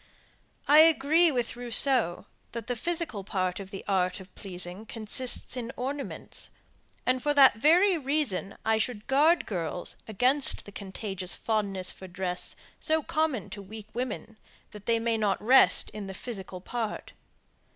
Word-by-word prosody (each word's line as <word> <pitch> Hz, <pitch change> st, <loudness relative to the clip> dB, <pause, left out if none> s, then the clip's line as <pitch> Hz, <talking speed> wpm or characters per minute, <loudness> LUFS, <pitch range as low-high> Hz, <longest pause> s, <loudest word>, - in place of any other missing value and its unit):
I 295 Hz, +2 st, +7 dB
agree 320 Hz, +1 st, +5 dB
with 245 Hz, -4 st, -2 dB
Rousseau, 240 Hz, -5 st, +3 dB, 0.3 s
that 235 Hz, -2 st, -5 dB
the 245 Hz, -, -2 dB
physical 320 Hz, -, -3 dB
part 185 Hz, -2 st, -2 dB
of 195 Hz, -1 st, -8 dB
the 195 Hz, -, -8 dB
art 185 Hz, -1 st, 0 dB
of 190 Hz, 0 st, -14 dB
pleasing 180 Hz, +1 st, -4 dB
consists 235 Hz, +4 st, -2 dB
in 240 Hz, -1 st, -4 dB
ornaments, 275 Hz, +3 st, -5 dB, 0.6 s
and 255 Hz, 0 st, +1 dB
for 290 Hz, +2 st, 0 dB
that 270 Hz, -4 st, +7 dB
very 340 Hz, -, +4 dB
reason 270 Hz, -9 st, -1 dB
I 220 Hz, 0 st, +2 dB
should 215 Hz, -1 st, -2 dB
guard 300 Hz, +6 st, +3 dB
girls 175 Hz, -2 st, -4 dB
against 255 Hz, +7 st, +3 dB
the 205 Hz, -, -10 dB
contagious 190 Hz, -2 st, -2 dB
fondness 200 Hz, -4 st, 0 dB
for 190 Hz, -, -11 dB
dress 180 Hz, 0 st, -2 dB, 0.2 s
so 315 Hz, 0 st, +1 dB
common 310 Hz, -, -1 dB
to 210 Hz, -2 st, -7 dB
weak 210 Hz, +2 st, -11 dB
women, 235 Hz, -2 st, -5 dB, 0.3 s
that 210 Hz, -1 st, -12 dB
they 230 Hz, -1 st, +3 dB
may 230 Hz, 0 st, 0 dB
not 210 Hz, -2 st, +1 dB
rest 255 Hz, +5 st, +4 dB
in 210 Hz, -2 st, -7 dB
the 195 Hz, -, -7 dB
physical 190 Hz, -5 st, -7 dB
part. 225 Hz, +1 st, -4 dB
225 Hz, 150 wpm, -28 LUFS, 195-270 Hz, 0.6 s, I